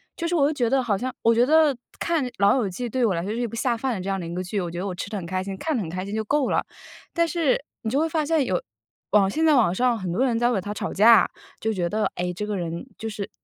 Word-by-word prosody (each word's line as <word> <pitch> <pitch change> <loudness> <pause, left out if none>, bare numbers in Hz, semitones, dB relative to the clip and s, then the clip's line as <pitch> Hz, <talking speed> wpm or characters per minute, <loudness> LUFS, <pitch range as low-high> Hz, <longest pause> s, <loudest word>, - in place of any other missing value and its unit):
就 335 - -3
是 345 - -2
我 285 -4 +4
就 305 - 0
觉 245 -5 0
得 270 +1 +3
好 220 -5 0
像 255 +4 -3
我 230 0 +4
觉 240 +2 +4
得 305 -2 +4 0.2
看 330 -5 0
《老 200 +2 +5
友 245 -6 +1
记》 240 +7 -4
对 255 0 +2
我 205 - +2
来 170 - -1
说 200 - -3
是 225 - -3
一 245 - 0
部 230 - -8
下 235 +1 0
饭 260 +2 -1
的 195 - -4
这 190 - -4
样 195 0 -1
的 175 - -5
一 170 - -5
个 180 - -2
剧， 190 +3 -3
我 175 -2 -4
觉 175 - -5
得 195 - -3
我 185 - -4
吃 195 - -5
得 210 - -2
很 190 - -5
开 185 +1 -2
心， 195 0 -5
看 315 +8 -2
得 - - -1
很 165 - -6
开 185 +2 -4
心 200 +2 -5
就 220 - -1
够 280 +5 +1
了。 - - +1 0.5
但 335 -1 +2
是， 325 -5 +1 0.2
你 220 - -2
就 265 +5 +1
会 325 +1 +1
发 315 -1 0
现 320 -1 +2
有 185 -8 0 0.5
网 200 -2 +4
现 315 +10 0
在 310 - +5
网 230 -11 +4
上 245 +4 +2
很 185 -3 -3
多 240 +10 +1
人 235 -3 +1
在 240 0 +3
为 235 -5 +1
它 205 +3 -5
吵 - - -4
架， 220 +2 +6 0.3
就 220 - -1
觉 180 -5 -1
得， 215 +4 0
哎， 180 0 -2
这 210 +4 -4
个 210 -1 -2
人 170 -1 -4
就 225 - -5
是 210 -2 -5
220 Hz, 350 characters per minute, -24 LUFS, 190-265 Hz, 0.5 s, 架